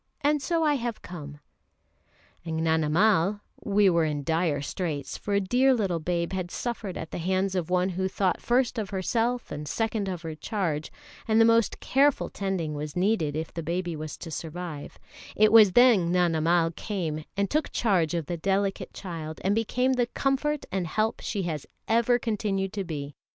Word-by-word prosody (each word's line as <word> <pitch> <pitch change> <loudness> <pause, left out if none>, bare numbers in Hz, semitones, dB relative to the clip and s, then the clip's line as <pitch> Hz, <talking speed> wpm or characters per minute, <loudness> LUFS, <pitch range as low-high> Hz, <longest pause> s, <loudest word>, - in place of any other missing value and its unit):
And 295 0 +2
so 330 +3 0
I 295 -2 +3
have 235 -2 -4
come!" 150 -4 -8 1.0
And 165 -1 -3
Gnanamal 165 +5 +2 0.2
we 205 0 +3
were 170 -3 +3
in 150 -2 -1
dire 160 -1 +1
straits, 145 -1 -4
for 205 - -2
a - - +4
dear 250 +7 +3
little 190 -7 0
babe 170 +2 -2
had 185 -2 -3
suffered 225 -3 -4
at 160 - -6
the - - -4
hands 190 +2 0
of 180 -3 -2
one 180 +1 +2
who 190 +1 -1
thought 190 -1 0
first 245 -1 +1
of 205 -3 -3
herself 230 +5 -1
and 150 0 -5
second 220 -1 -1
of 180 -2 -5
her 160 -1 -4
charge, 155 -2 -3 0.4
and 220 0 +3
the 225 - +7
most 230 -1 +3
careful 280 +1 +2
tending 190 -6 -2
was 150 0 -5
needed 180 -6 +1
if 160 +1 -4
the 165 - -4
baby 170 +1 -2
was 155 0 -6
to 165 - -8
survive 160 -2 -6 0.4
it 215 0 +5
was 215 -4 +8
then 225 -8 +5
Gnanamal 170 -1 +2
came 165 -7 -3
and 200 0 +2
took 305 +6 -1
charge 180 -7 +1
of 165 -3 -2
the 175 +4 -3
delicate 195 +3 -1
child, 160 -4 -6
and 195 - +2
became 250 +4 +1
the 245 -2 +1
comfort 275 +3 -1
and 185 -3 -1
help 215 +7 0
she 200 -3 -2
has 155 -5 -4 0.2
ever 235 +2 +3
continued 205 -4 -2
to 200 - -2
be. 145 -5 -5
185 Hz, 180 wpm, -27 LUFS, 165-220 Hz, 1.0 s, was